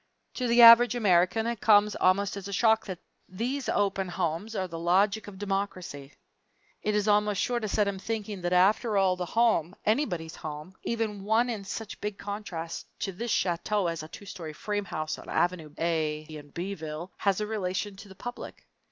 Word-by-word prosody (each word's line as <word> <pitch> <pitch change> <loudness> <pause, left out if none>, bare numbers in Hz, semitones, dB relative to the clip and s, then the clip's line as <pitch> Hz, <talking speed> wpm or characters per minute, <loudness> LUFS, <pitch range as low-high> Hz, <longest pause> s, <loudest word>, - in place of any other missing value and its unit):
To 250 - -2
the 235 0 +6
average 235 +1 +9
American 200 0 +3
it 235 -3 -3
comes 210 -1 +5
almost 190 +2 +2
as 200 -1 -6
a - - -6
shock 220 +2 +3
that 185 -2 -4 0.3
these 245 +8 -3
open 195 -2 0
homes 175 +5 -2
are 190 -2 -1
the 165 -1 -7
logic 195 +5 +2
of 200 -2 -9
democracy. 190 -8 -4 0.7
It 210 0 0
is 210 0 +1
almost 210 -1 +3
sure 245 -1 0
to 215 - -3
set 210 0 +1
him 195 -1 -3
thinking 210 -2 -4
that 175 0 -1
after 200 +4 +3
all 190 -1 +3
the 180 -1 -4
home, 210 -6 +2
anybody's 190 - 0
home, 155 +3 -7
even 220 -4 -2
one 225 +4 +2
in 210 -4 -5
such 215 +2 -6
big 210 -1 -3
contrast 200 -5 -6
to 195 - -1
this 230 +6 -5
chateau 195 +2 0
as 165 -2 -2
a 155 - -8
two 200 - -11
story 165 -5 -7
frame 205 +5 -3
house, 155 -3 -4
on - - -11
Avenue 175 -4 0
A, 160 -2 0
in 155 -2 -11
B 180 +6 -4
ville, 160 +1 -6
has 200 -1 +1
a 210 - -1
relation 205 -1 -3
to 205 - -11
the 190 - -12
public. 245 +5 -8
195 Hz, 195 wpm, -28 LUFS, 175-215 Hz, 0.7 s, average